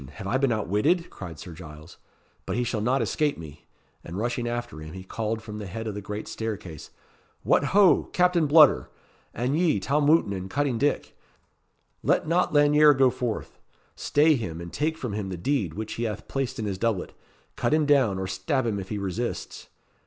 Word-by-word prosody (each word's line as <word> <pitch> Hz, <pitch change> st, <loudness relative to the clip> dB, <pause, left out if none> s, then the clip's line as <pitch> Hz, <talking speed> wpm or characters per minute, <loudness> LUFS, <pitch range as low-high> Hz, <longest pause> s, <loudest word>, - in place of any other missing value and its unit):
have 100 Hz, -, -9 dB
I 120 Hz, +7 st, 0 dB
been 135 Hz, -2 st, +2 dB
outwitted?" 110 Hz, -, +1 dB
cried 85 Hz, -5 st, -8 dB
Sir 85 Hz, -, -9 dB
Giles. 80 Hz, -1 st, -12 dB, 0.5 s
"But -, -, -2 dB
he 125 Hz, -, 0 dB
shall 115 Hz, -2 st, -2 dB
not 125 Hz, +5 st, +1 dB
escape 150 Hz, -2 st, 0 dB
me." 75 Hz, -2 st, -11 dB, 0.4 s
And 85 Hz, +3 st, -7 dB
rushing 120 Hz, +2 st, -2 dB
after 120 Hz, -6 st, -4 dB
him, 80 Hz, 0 st, -9 dB
he 95 Hz, 0 st, -8 dB
called 110 Hz, +3 st, -3 dB
from 105 Hz, -1 st, -7 dB
the 105 Hz, -, -6 dB
head 110 Hz, +5 st, -6 dB
of 110 Hz, -, -3 dB
the 105 Hz, -, -6 dB
great 105 Hz, +1 st, -6 dB
staircase 100 Hz, -9 st, -6 dB, 0.5 s
"What, -, -, +3 dB
ho! 200 Hz, -2 st, +5 dB
Captain 180 Hz, -3 st, +3 dB
Bludder! 150 Hz, -1 st, +6 dB, 0.4 s
and 125 Hz, +5 st, -1 dB
ye, 160 Hz, -, +2 dB
Tom 145 Hz, +8 st, +1 dB
Wootton 155 Hz, -10 st, +4 dB
and 95 Hz, 0 st, -5 dB
Cutting 140 Hz, -1 st, 0 dB
Dick 145 Hz, +1 st, -1 dB, 0.9 s
let -, -, +1 dB
not 170 Hz, +3 st, +2 dB
Lanyere 150 Hz, 0 st, +6 dB
go 130 Hz, -1 st, +4 dB
forth. 120 Hz, -3 st, -4 dB, 0.4 s
Stay 155 Hz, +2 st, +3 dB
him 90 Hz, -, -4 dB
and 85 Hz, 0 st, -8 dB
take 160 Hz, +2 st, -1 dB
from 125 Hz, -9 st, -4 dB
him 100 Hz, -2 st, -3 dB
the 90 Hz, -, -5 dB
deed 95 Hz, -, -1 dB
which 110 Hz, +1 st, -5 dB
he 120 Hz, -, -3 dB
hath 105 Hz, -3 st, -5 dB
placed 135 Hz, -2 st, -3 dB
in 110 Hz, -, -3 dB
his 95 Hz, -2 st, -3 dB
doublet. 110 Hz, -5 st, -1 dB, 0.4 s
Cut -, -, 0 dB
him 155 Hz, 0 st, +3 dB
down, 135 Hz, -9 st, +3 dB
or 95 Hz, -, -3 dB
stab 95 Hz, +8 st, -1 dB
him 105 Hz, -3 st, -1 dB
if 95 Hz, -, -7 dB
he 105 Hz, -, -3 dB
resists." 100 Hz, +5 st, -4 dB
115 Hz, 195 wpm, -26 LUFS, 95-145 Hz, 0.9 s, Bludder